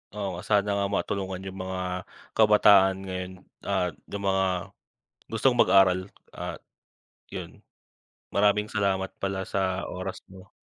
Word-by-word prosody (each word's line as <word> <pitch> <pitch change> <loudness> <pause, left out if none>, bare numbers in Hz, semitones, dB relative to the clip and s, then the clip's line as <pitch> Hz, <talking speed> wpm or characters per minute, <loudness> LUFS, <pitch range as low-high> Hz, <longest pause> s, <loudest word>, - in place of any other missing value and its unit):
Oo 105 -1 -2
nga, 85 - -7
sana 105 -1 +2
nga 100 0 +1
matulungan 95 -2 -2
'yong 95 0 -6
mga, 95 0 -4 0.5
kabataan 105 -3 +6
ngayon 90 0 -4 0.3
at 90 -5 0 0.2
'yong 100 0 -4
mga, 95 0 +2 0.8
gustong 120 +2 +1
mag-aral 95 -3 +5 0.2
at - - -6 0.7
'yon. - - -8 0.7
Maraming 105 +1 +2
salamat 95 -2 0
pala 95 -1 -3
sa 95 -1 -1
oras 95 +1 -5
mo. 95 +1 -15
95 Hz, 125 wpm, -27 LUFS, 95-100 Hz, 0.8 s, kabataan